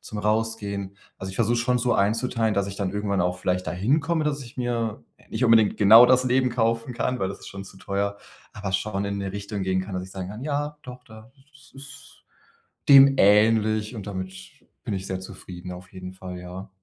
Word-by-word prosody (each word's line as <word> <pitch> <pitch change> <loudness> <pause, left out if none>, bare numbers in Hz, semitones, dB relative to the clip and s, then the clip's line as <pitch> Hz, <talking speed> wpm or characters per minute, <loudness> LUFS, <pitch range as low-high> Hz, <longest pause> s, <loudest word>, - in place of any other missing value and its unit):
zum 110 - -9
Rausgehen. 105 -2 -2 0.2
Also, 95 - -6
ich 95 - -7
versuche 120 +1 +2
schon, 125 +1 +1
so 125 0 +1
einzuteilen, 110 +2 +1
dass 100 0 0
ich 100 - -7
dann 95 -2 -2
irgendwann 100 -1 -1
auch 90 0 0
vielleicht 90 0 -1
dahin 100 - +1
komme, 160 +1 -1
dass 145 -2 -1
ich 120 -2 -13
mir 120 -3 -2 0.2
nicht 125 - -1
unbedingt 115 -3 +4
genau 110 +4 +8
das 130 +1 +4
Leben 130 0 +2
kaufen 115 +1 -1
kann, 125 +2 -1
weil 95 - -1
das 100 - -8
ist - - -10
schon 95 0 -8
zu - - -14
teuer, 100 +1 -2 0.4
aber 100 -2 -5
schon 95 +1 -1
in 100 0 -3
'ne 100 -1 -3
Richtung 100 0 -5
gehen 95 0 0
kann, 95 +1 -9
dass 90 0 -3
ich 95 - -12
sagen 95 -1 -6
kann: 105 +4 -8
„Ja, 145 +1 -3
doch 125 -1 -11
da 110 +1 -15 0.2
es 145 0 -20
ist 140 +1 -14 0.6
dem 135 -1 +8
ähnlich, 110 +1 +3
und 105 -3 -7
damit 95 -2 -5 0.5
bin - - -2
ich 95 -1 -4
sehr 95 -1 -3
zufrieden.“ 90 -1 -9
Auf 90 0 -12
jeden 90 0 -9
Fall, 90 -1 -8
ja. 90 +2 -9
105 Hz, 215 wpm, -24 LUFS, 95-120 Hz, 0.6 s, genau